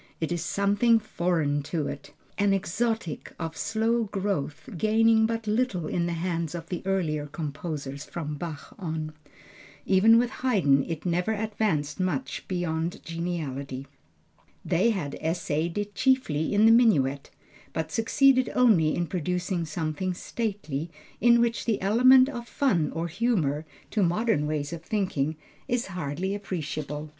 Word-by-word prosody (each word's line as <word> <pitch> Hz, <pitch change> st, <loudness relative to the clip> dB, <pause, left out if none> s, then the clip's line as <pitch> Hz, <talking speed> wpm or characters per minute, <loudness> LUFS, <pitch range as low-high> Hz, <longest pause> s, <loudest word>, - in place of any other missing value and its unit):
It 160 Hz, 0 st, -2 dB
is 175 Hz, -1 st, -1 dB
something 205 Hz, +4 st, +3 dB
foreign 170 Hz, -8 st, 0 dB
to 155 Hz, +1 st, -2 dB
it, -, -, -6 dB, 0.3 s
an 200 Hz, -1 st, +3 dB
exotic, 195 Hz, -1 st, -2 dB
of 165 Hz, -1 st, -4 dB
slow 225 Hz, +3 st, 0 dB
growth, 195 Hz, -8 st, -3 dB
gaining 220 Hz, +3 st, +4 dB
but 225 Hz, -1 st, -3 dB
little 210 Hz, -6 st, 0 dB
in 170 Hz, +2 st, -1 dB
the 170 Hz, -, -1 dB
hands 170 Hz, -1 st, -2 dB
of 165 Hz, 0 st, -7 dB
the 180 Hz, -, -3 dB
earlier 155 Hz, -6 st, 0 dB
composers 145 Hz, -2 st, -5 dB
from 155 Hz, -3 st, -5 dB
Bach 150 Hz, -1 st, -7 dB
on. 160 Hz, -4 st, -4 dB, 0.7 s
Even 215 Hz, +4 st, +6 dB
with 240 Hz, +1 st, +2 dB
Haydn 175 Hz, -, +3 dB
it 165 Hz, -1 st, -5 dB
never 180 Hz, +5 st, +1 dB
advanced 210 Hz, -9 st, -1 dB
much 185 Hz, +8 st, -2 dB
beyond 170 Hz, -2 st, -2 dB
geniality. 145 Hz, -6 st, -4 dB, 0.8 s
They 180 Hz, +6 st, +3 dB
had 175 Hz, -11 st, -2 dB
essayed 165 Hz, 0 st, -1 dB
it 205 Hz, 0 st, -3 dB
chiefly 255 Hz, -, +1 dB
in 205 Hz, +1 st, +4 dB
the 225 Hz, -, +8 dB
minuet, 145 Hz, -, +3 dB, 0.4 s
but 160 Hz, 0 st, -3 dB
succeeded 255 Hz, -, +3 dB
only 190 Hz, -11 st, +4 dB
in 175 Hz, -, 0 dB
producing 180 Hz, +1 st, -2 dB
something 160 Hz, +3 st, -2 dB
stately, 185 Hz, -9 st, -3 dB, 0.3 s
in 235 Hz, 0 st, +5 dB
which 235 Hz, -2 st, +1 dB
the 225 Hz, -3 st, +1 dB
element 255 Hz, +6 st, +6 dB
of 240 Hz, -4 st, -6 dB
fun 185 Hz, -, +1 dB
or 165 Hz, +1 st, -2 dB
humor, 165 Hz, -, 0 dB, 0.2 s
to 215 Hz, -, +1 dB
modern 180 Hz, -3 st, +1 dB
ways 150 Hz, 0 st, -2 dB
of 165 Hz, -, -6 dB
thinking 165 Hz, -6 st, -1 dB, 0.3 s
is 245 Hz, 0 st, 0 dB
hardly 175 Hz, +3 st, -2 dB
appreciable. 155 Hz, -6 st, -4 dB
175 Hz, 140 wpm, -27 LUFS, 155-220 Hz, 0.8 s, the